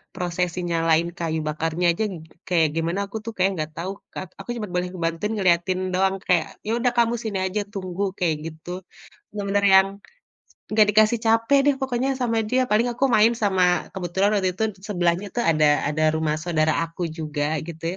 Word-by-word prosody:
prosesi 180 Hz, 0 st, -2 dB
nyalain 165 Hz, 0 st, +2 dB
kayu 165 Hz, -2 st, -2 dB
bakarnya 165 Hz, +3 st, -1 dB
aja 220 Hz, -, -2 dB, 0.4 s
kayak 165 Hz, -4 st, +3 dB
gimana, 165 Hz, +4 st, -1 dB
aku 200 Hz, +3 st, -6 dB
tuh 230 Hz, -, -5 dB
kayak 185 Hz, +1 st, +3 dB
nggak 155 Hz, -2 st, -4 dB
tahu, 175 Hz, +3 st, -3 dB, 0.2 s
Kak. 185 Hz, -1 st, -7 dB
Aku -, -, -10 dB
cuma 215 Hz, -, -3 dB
boleh 180 Hz, 0 st, 0 dB
ngebantuin 170 Hz, +3 st, -2 dB
ngelihatin 185 Hz, 0 st, +2 dB
doang, 190 Hz, +1 st, +2 dB
kayak, 175 Hz, -3 st, 0 dB
"Yaudah 235 Hz, +3 st, +1 dB
kamu 235 Hz, 0 st, +3 dB
sini 210 Hz, -4 st, -3 dB
aja, 205 Hz, +3 st, -1 dB
tunggu!", 190 Hz, 0 st, -2 dB
kayak 165 Hz, -4 st, +1 dB
gitu. 170 Hz, +3 st, -7 dB, 0.5 s
Bener-bener 200 Hz, -1 st, -1 dB
yang 190 Hz, 0 st, +7 dB, 0.8 s
nggak 215 Hz, 0 st, +5 dB
dikasih 215 Hz, +2 st, +4 dB
capek 230 Hz, +5 st, +4 dB
deh 285 Hz, -, +5 dB
pokoknya 265 Hz, 0 st, 0 dB
sama 230 Hz, -2 st, +1 dB
dia. 255 Hz, +3 st, +2 dB
Paling 220 Hz, +3 st, +3 dB
aku 255 Hz, +3 st, 0 dB
main 225 Hz, +1 st, +5 dB
sama 185 Hz, -5 st, +1 dB
kebetulan 190 Hz, +1 st, 0 dB
waktu 185 Hz, -2 st, 0 dB
itu 220 Hz, -, -1 dB, 0.2 s
sebelahnya 175 Hz, -1 st, 0 dB
tuh 240 Hz, -, 0 dB
ada 155 Hz, -4 st, +3 dB
ada 155 Hz, +1 st, 0 dB
rumah 155 Hz, -1 st, 0 dB
saudara 155 Hz, -1 st, +1 dB
aku 165 Hz, +2 st, -7 dB
juga, 155 Hz, -1 st, -2 dB
gitu 165 Hz, -1 st, -9 dB
185 Hz, 175 wpm, -23 LUFS, 165-210 Hz, 0.8 s, yang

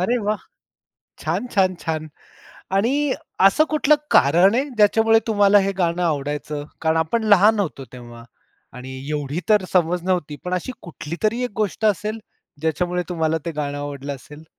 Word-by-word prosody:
अरे 230 Hz, +7 st, +1 dB
वाह! 210 Hz, 0 st, 0 dB, 0.8 s
छान! 250 Hz, -, -2 dB
छान! 185 Hz, -2 st, +3 dB
छान! 155 Hz, -1 st, -3 dB, 0.7 s
आणि 230 Hz, +6 st, +1 dB, 0.5 s
असं 195 Hz, +11 st, +5 dB
कुठलं 305 Hz, -1 st, +4 dB, 0.2 s
कारण 175 Hz, +9 st, +5 dB
आहे 260 Hz, +3 st, +2 dB
ज्याच्यामुळे 225 Hz, +1 st, +4 dB
तुम्हाला 205 Hz, -2 st, +4 dB
हे 195 Hz, -, 0 dB
गाणं 175 Hz, 0 st, 0 dB
आवडायचं? 145 Hz, -1 st, -2 dB, 0.2 s
कारण 160 Hz, 0 st, +1 dB
आपण 160 Hz, +9 st, 0 dB
लहान 210 Hz, +3 st, +4 dB
होतो 155 Hz, -8 st, -4 dB
तेव्हा 120 Hz, -2 st, -11 dB, 0.5 s
आणि 130 Hz, +1 st, -8 dB
एवढी 150 Hz, +2 st, -2 dB
तर 210 Hz, -3 st, +4 dB
समज 175 Hz, -1 st, +2 dB
नव्हती, 180 Hz, -6 st, -1 dB
पण 180 Hz, -, -4 dB
अशी 185 Hz, +8 st, -3 dB
कुठलीतरी 175 Hz, +9 st, -3 dB
एक 245 Hz, -, -3 dB
गोष्ट 210 Hz, +2 st, -3 dB
असेल 215 Hz, +2 st, 0 dB, 0.4 s
ज्याच्यामुळे 175 Hz, +3 st, -1 dB
तुम्हाला 160 Hz, -2 st, 0 dB
ते -, -, -1 dB
गाणं 145 Hz, -1 st, -3 dB
आवडलं 145 Hz, -1 st, -5 dB
असेल? 150 Hz, +3 st, -13 dB
175 Hz, 150 wpm, -21 LUFS, 150-210 Hz, 0.8 s, असं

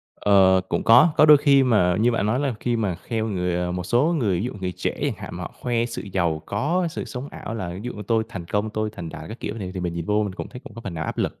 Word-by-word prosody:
Ờ, 95 Hz, -2 st, +5 dB
cũng -, -, -1 dB
có, 115 Hz, +9 st, +7 dB
có 155 Hz, -, +6 dB
đôi 150 Hz, -1 st, +9 dB
khi 140 Hz, -1 st, +5 dB
mà 95 Hz, -8 st, +3 dB
như 120 Hz, +2 st, +4 dB
bạn 110 Hz, -3 st, 0 dB
nói 115 Hz, +5 st, +1 dB
là 140 Hz, -4 st, -1 dB
khi 120 Hz, -1 st, 0 dB
mà 105 Hz, -5 st, -1 dB
kheo 110 Hz, +5 st, -3 dB
người 90 Hz, -4 st, -1 dB
à, 90 Hz, 0 st, -1 dB
một 90 Hz, 0 st, -3 dB
số 130 Hz, -, +2 dB
người 100 Hz, -8 st, +1 dB
ví -, -, -2 dB
dụ 125 Hz, -, -3 dB
người 90 Hz, -1 st, -2 dB
trẻ -, -, -3 dB
chẳng -, -, +1 dB
hạn -, -, -8 dB
mà 90 Hz, -, -6 dB
họ 85 Hz, -, -6 dB
khoe 120 Hz, -1 st, 0 dB
sự 120 Hz, -, -6 dB
giàu 85 Hz, -4 st, 0 dB
có, 165 Hz, -, 0 dB
sự -, -, -5 dB
sống 130 Hz, +1 st, -6 dB
ảo 110 Hz, -, -7 dB
là 100 Hz, -6 st, -4 dB
ví -, -, -7 dB
dụ 125 Hz, +1 st, -4 dB
như 105 Hz, -, -7 dB
tôi 115 Hz, -1 st, +2 dB
thành 95 Hz, -6 st, -7 dB
công, 105 Hz, +5 st, -1 dB
tôi 110 Hz, 0 st, -2 dB
thành 85 Hz, -, -6 dB
đạt -, -, -8 dB
các 110 Hz, -, -9 dB
kiểu, 105 Hz, -, -4 dB
thì 95 Hz, -3 st, -5 dB
thì 95 Hz, -, -5 dB
mình 85 Hz, -1 st, -3 dB
nhìn 85 Hz, -1 st, -3 dB
vô 105 Hz, +1 st, +2 dB
mình 100 Hz, -2 st, -3 dB
cũng 95 Hz, -, -7 dB
thấy 125 Hz, -, -10 dB
cũng 105 Hz, -, -11 dB
có 115 Hz, -, -8 dB
phần 100 Hz, -6 st, -6 dB
nào 80 Hz, -2 st, -3 dB
áp -, -, -5 dB
lực. -, -, -2 dB
105 Hz, 315 wpm, -23 LUFS, 90-120 Hz, -, đôi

